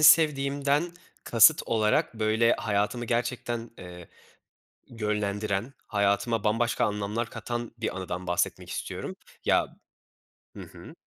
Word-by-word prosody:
sevdiğimden 145 +1 +4 0.3
kasıt 145 +7 +6
olarak 110 +1 +1
böyle 110 +1 +3
hayatımı 105 +3 -1
gerçekten, 120 0 -2
eee, 90 -1 -10 0.8
yönlendiren, 105 +1 -2
hayatıma 100 +2 +1
bambaşka 115 +2 +1
anlamlar 105 +3 -2
katan 120 +1 -5
bir 110 -4 -3
anıdan 90 -1 -5
bahsetmek 90 0 -1
istiyorum. - - -5 0.3
Ya - - +3 0.9
hı - - -7
hı. - - -12
115 Hz, 105 wpm, -27 LUFS, 105-120 Hz, 0.9 s, kasıt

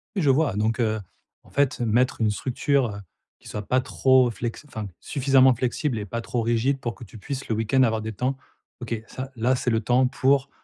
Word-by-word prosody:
Je 155 -8 +2
vois 140 -4 +3
donc, 110 +3 0
heu, 110 -2 +1 0.4
en - - -20
fait, 140 -2 +1
mettre 120 +1 +1
une 105 -1 +3
structure, 125 -2 0 0.4
qui - - -16
soit 105 -1 -6
pas 130 +1 +2
trop 130 -1 +3
flex 120 +6 -5
enfin 110 -6 -6
suffisamment 135 -2 +4
flexible 120 +1 -1
et 105 - -5
pas 115 +4 -3
trop 120 +1 -2
rigide, 120 +4 +1
pour 120 -3 -4
que 120 - -12
tu 110 +1 -12
puisses, 135 +5 -6
le 110 - 0
week-end, 115 +4 +2
avoir 110 -3 +1
des 110 0 -5
temps. 125 +6 -1 0.5
OK, 120 -1 -3
ça, 130 +1 -6
là, 120 +3 +2
c'est 125 - -1
le 115 -1 +2
temps 125 +3 +3
pour 135 +1 +2
125 Hz, 210 wpm, -24 LUFS, 110-130 Hz, 0.5 s, suffisamment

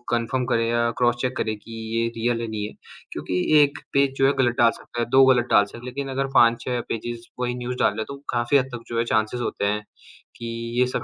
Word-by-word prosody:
Confirm 125 +2 -1
करें 115 0 +2
या 120 0 +2
cross 120 -1 +3
check 130 -1 -1
करें, 110 0 -1
कि 115 +2 -15 0.3
ये 115 - +1
रियल 115 0 0
है, 115 - -3
नहीं 105 -1 -3
है? - - -11 0.4
क्योंकि 90 0 -2 0.2
1 140 -1 +1
पेज 140 -1 +3
जो 135 - +4
है 140 - +3
गलत 120 0 +1
डाल 115 -1 +5
सकता 120 - -9
है, - - +1
2 135 +1 +6
गलत 125 -2 +4
डाल 100 - +6
सकते 105 - -12
हैं, 120 - -11
लेकिन 135 +2 -5
अगर 135 0 +1
5-6 120 +1 +3
पेजेज़ 115 +1 -5
वही 125 0 -1
न्यूज़ 125 0 -4
डाल - - +3
रहे, 110 - -3
तो 140 - -8
काफ़ी 120 +3 +2
हद 130 - +2
तक 115 - -9
जो 115 - -4
है - - +3
चांसेज़ 110 +3 0
होते 100 - -2
हैं, 105 +1 0 0.5
कि 115 - -8 0.3
ये 125 - +5
सब - - -3
120 Hz, 250 wpm, -24 LUFS, 115-125 Hz, 0.5 s, 2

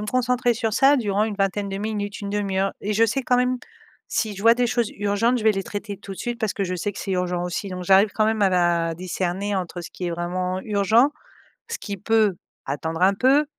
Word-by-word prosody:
me 210 - -4
concentrer 250 -1 +2
sur 225 -1 -2
ça 280 +2 +5
durant 205 -4 0
une 210 -2 -4
vingtaine 200 0 0
de 195 - -3
minutes, 205 -1 -3
1/2 200 -1 -2
heure», 195 +1 +1
et 210 +2 -2
je 225 +2 +4
sais 255 +5 -1
quand 250 0 +2
même 250 0 +2 0.5
si 215 -3 -1
je 200 - -7
vois 230 +1 +7
des 245 0 +1
choses 235 -1 0
urgentes. 205 +5 +1
Je 220 - -5
vais 220 - +5
les 195 -1 -2
traiter 205 0 -6
tout 195 - -12
de - - -9
suite 240 -1 -3
parce 220 -3 0
que 200 - -2
je 185 0 -3
sais 205 +4 -2
que - - -10
c'est 195 - -3
urgent 180 -1 -1
aussi 180 +3 -3
donc 180 -1 -5
j'arrive 195 +3 +5
quand 215 - +2
même 220 -1 +1
à 195 - +5
la 170 -2 +2
discerner 185 +2 -2
entre 180 -1 -3
ce 170 - -8
qui 180 - -6
est - - -3
vraiment 180 +2 -2
urgent 215 +6 +3 0.6
ce 465 - -5
qui 200 -1 -5
peut 215 -2 +2 0.3
attendre 160 +4 -3
un 190 +2 +5
peu, 270 +7 +4
205 Hz, 245 wpm, -23 LUFS, 185-225 Hz, 0.6 s, vois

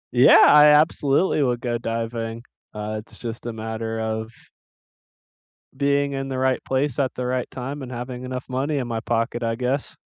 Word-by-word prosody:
Yeah, 125 +2 +8
I 150 0 +8
absolutely 150 +1 +3
would 125 -3 +1
go 120 -1 -2
diving. 115 0 -4 0.3
Uh, 105 0 -4
it's 105 - -13
just 115 0 -6
a - - -2
matter 110 0 -4
of 110 0 -3 1.4
being 140 0 +1
in 135 0 -3
the 130 - -3
right 130 0 0
place 135 0 0
at 130 -2 0
the 125 - -3
right 125 0 -2
time, 135 +3 -6
and 130 -1 -7
having 125 +1 -6
enough 130 0 -5
money 140 +3 -1
in 125 - -2
my 115 -1 -2
pocket, 115 +1 -1
I 115 0 0
guess. 130 +3 -2
125 Hz, 180 wpm, -23 LUFS, 115-135 Hz, 1.4 s, Yeah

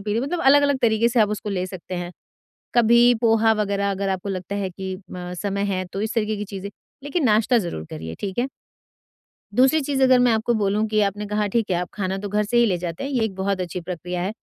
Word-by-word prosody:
P 205 +1 -2
लें 230 - +1
मतलब 290 +7 -2
अलग-अलग 285 0 +4
तरीके 230 0 +3
से 240 0 +2
आप 210 - +4
उसको 210 0 -4
ले 185 -2 -1
सकते 185 0 -8
हैं। 175 0 -5 0.6
कभी 240 +1 +6
पोहा 225 -1 +4
वगैरह 200 -1 0
अगर 195 0 -2
आपको 190 +1 -2
लगता 185 0 -4
है 195 -2 -2
कि 190 +1 -5
म 180 0 -6
समय 200 0 -1
है 185 - -2
तो 195 - -3
इस 220 +2 -2
तरीके 215 -1 0
की 210 - -4
चीजें, 200 -1 -7 0.4
लेकिन 290 +1 -1
नाश्ता 225 +2 +4
ज़रूर 170 - -4
करिए, 80 +1 -6
ठीक 195 0 -4
है? 255 +3 +1 1.1
दूसरी 265 +7 +4
चीज़ 270 -1 0
अगर 255 -1 +6
मैं 245 -1 +4
आपको 225 +2 +1
बोलूँ 205 +2 +1
कि 215 0 +1
आपने 205 +1 -1
कहा 210 0 0
ठीक 225 +1 -1
है, - - +2
आप 180 - -5
खाना 190 -1 -2
तो 205 0 -5
घर 210 +1 +1
से 240 +4 0
ही 235 - +6
ले 190 -5 +1
जाते 170 +2 -5
हैं, 275 - -3
ये 245 -4 +1
एक 195 -4 -5
बहुत 190 0 -1
अच्छी 180 0 -4
प्रक्रिया 180 0 -5
है। 190 +4 -2
205 Hz, 245 wpm, -23 LUFS, 190-235 Hz, 1.1 s, कभी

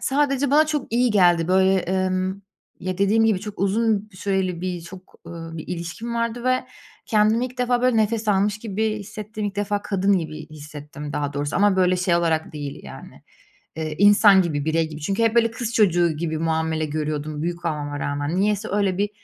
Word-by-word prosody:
Sadece 275 -1 +1
bana 305 +2 +5
çok 295 -7 -3
iyi 245 0 +3
geldi, 175 -4 +4
böyle. 190 +1 +4
Emm, 185 +1 -1 0.4
ya, 185 +1 -4
dediğim 215 +3 +3
gibi, 210 -4 +2
çok 210 -1 -8
uzun 215 +1 +1
süreli 185 -2 -1
bir, 180 -2 -3
çok, 185 +2 -13
ııı, 165 -1 -8
bir 155 - -8
ilişkim 180 +7 -5
vardı 235 +1 -2
ve 255 0 +1 0.4
kendimi 220 +2 +3
ilk 250 0 -13
defa, 245 0 +1
böyle, 250 -2 +3
nefes 220 0 +1
almış 205 +1 +2
gibi 220 0 -1
hissettim. 215 +1 -7
İlk 205 0 -6
defa 205 0 -1
kadın 195 -1 +1
gibi 155 -1 -7
hissettim 150 -1 -9
daha 145 -1 -2
doğrusu 145 +1 -2
ama, 205 0 +3
böyle, 185 -1 +3
şey 180 -1 +1
olarak 160 -2 0
değil, 145 -2 -6
yani, - - -11 0.5
eee, 155 -1 -4
insan 205 -1 +6
gibi, 150 -4 -2
birey 160 0 +1
gibi. 155 -1 -9
Çünkü 195 +9 -1
hep, 225 0 +2
böyle, 230 -1 +4
kız 230 0 -4
çocuğu 175 -5 +3
gibi 160 -1 -2
muamele 160 0 0
görüyordum 150 0 -3
büyük 170 0 -4
olmama 145 -2 -3
rağmen. 145 +4 -2
Niyeyse 210 +2 0
öyle 200 -2 +1
bir, 205 +1 0
190 Hz, 185 wpm, -23 LUFS, 165-215 Hz, 0.5 s, insan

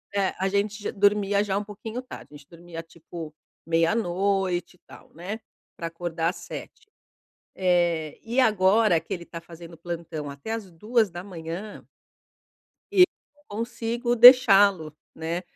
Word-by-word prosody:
eh, 195 -2 +1
a 190 - +1
gente 205 +2 -1
j - - -3
dormia 205 0 +2
já 195 -1 -1
um 205 - -2
pouquinho 215 +4 -7
tarde, 255 - -11
a - - -9
gente 140 - -19
dormia 170 -1 -9
tipo 165 -1 -10 0.3
24h 180 +1 0
e - - -47
tal, - - -16
né 190 +7 -6 0.4
pra 165 - -4
acordar 165 0 -2
às 180 - -6
7h, 445 - -10 0.7
eh, 175 -4 +1
e 235 +3 -1
agora 210 -5 +4
que 195 - -7
ele 170 -2 -6
tá 165 0 -9
fazendo 170 0 -12
plantão 165 -3 -6
até 140 +10 -7
às 225 -4 -4
2h 215 +5 0
da 175 +1 -8
manhã 180 +2 -8 1.1
eu 380 -2 +7 0.3
não 295 - -28
consigo 240 +1 -2
deixá-lo, 200 - +7 0.2
né? 165 +2 -3
185 Hz, 150 wpm, -25 LUFS, 165-215 Hz, 1.1 s, eu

